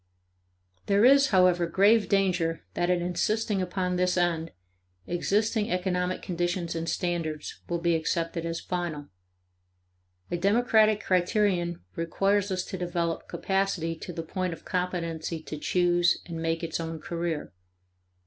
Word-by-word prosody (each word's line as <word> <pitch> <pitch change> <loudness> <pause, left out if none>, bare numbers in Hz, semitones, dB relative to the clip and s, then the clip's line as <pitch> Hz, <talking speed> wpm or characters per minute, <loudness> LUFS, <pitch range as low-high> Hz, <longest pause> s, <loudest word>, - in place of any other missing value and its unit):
There 200 +3 +4
is, 275 +1 +7
however, 180 -4 +4
grave 205 +5 +4
danger 180 -4 +1
that 175 0 0
in 180 -1 +2
insisting 210 +3 0
upon 180 0 -1
this 180 0 +1
end, 170 -2 +1 0.6
existing 210 +5 0
economic 180 -1 -1
conditions 175 -1 -2
and 165 0 -3
standards 165 -4 -3
will 170 - 0
be 170 0 +1
accepted 165 +1 -1
as 165 0 -3
final. 170 -5 -4 1.2
A 175 - 0
democratic 215 +2 +3
criterion 180 -1 +1
requires 195 +4 +1
us 185 -1 -2
to 190 - -6
develop 170 -2 -2
capacity 190 -4 -1
to 180 - -7
the 165 -1 -5
point 185 +2 -3
of - - -12
competency 170 -3 -2
to 150 - -6
choose 175 +1 +2
and 165 -2 -6
make 165 +1 -1
its 165 0 -2
own 165 0 -4
career. 170 - -3
175 Hz, 135 wpm, -27 LUFS, 165-190 Hz, 1.2 s, is